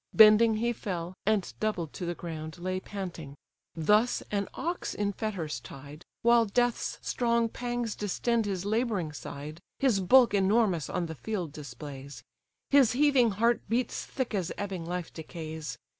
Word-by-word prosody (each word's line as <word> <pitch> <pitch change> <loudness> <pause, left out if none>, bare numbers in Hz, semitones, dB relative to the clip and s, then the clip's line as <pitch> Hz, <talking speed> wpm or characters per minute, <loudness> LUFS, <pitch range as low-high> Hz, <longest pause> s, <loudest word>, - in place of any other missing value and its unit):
Bending 220 +1 +8
he 235 +2 0
fell, 180 -6 -4
and 215 -3 +1
doubled 185 -8 -2
to 180 - -5
the 175 - -2
ground, 160 -2 -6
Lay 185 +1 -2
panting. 180 -8 -7 0.4
Thus 210 +9 +3
an 200 -1 0
ox 345 +2 -3
in 205 -1 -1
fetters 180 - -3
tied, 140 +5 -11 0.2
While 235 0 +5
death's 245 +3 0
strong 235 -1 +1
pangs 240 -2 -3
distend 225 +2 0
his 190 -2 -2
labouring 210 -7 0
side, 150 +2 -7 0.2
His 255 -7 +2
bulk 240 +5 +6
enormous 195 -4 +2
on 180 -1 -1
the 160 - -5
field 180 -1 -4
displays; 140 -2 -9 0.5
His 275 -5 +6
heaving 270 -3 +4
heart 235 +2 +3
beats 235 +1 0
thick 260 -4 -4
as 185 -4 -1
ebbing 190 -5 -4
life 180 -1 -4
decays. 160 -3 -6
200 Hz, 150 wpm, -29 LUFS, 165-230 Hz, 0.5 s, Bending